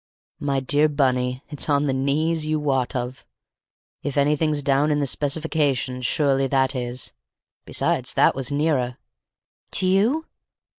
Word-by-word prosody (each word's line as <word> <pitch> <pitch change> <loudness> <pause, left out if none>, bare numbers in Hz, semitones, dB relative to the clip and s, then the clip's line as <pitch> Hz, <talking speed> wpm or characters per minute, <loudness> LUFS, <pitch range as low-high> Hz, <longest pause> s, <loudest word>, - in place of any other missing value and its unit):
"My 140 -1 0
dear 145 +3 +2
Bunny, 130 -3 0
it's 145 +1 -2
on 145 0 +2
the 135 - 0
knees 155 +4 0
you 155 0 0
wot 135 -4 0
of. 125 +1 -4 0.8
If 145 -1 -4
anything's 150 +1 +2
down 140 +2 +2
in 150 -1 +1
the 145 - +1
specifications 140 -3 0
surely 135 -3 +2
that 135 0 +1
is. 125 -1 -3 0.5
Besides—that - - +2
was 135 +1 -2
nearer!" 140 -4 0 0.8
"To - - +1
you?" 220 +12 +2
140 Hz, 135 wpm, -23 LUFS, 130-150 Hz, 0.8 s, dear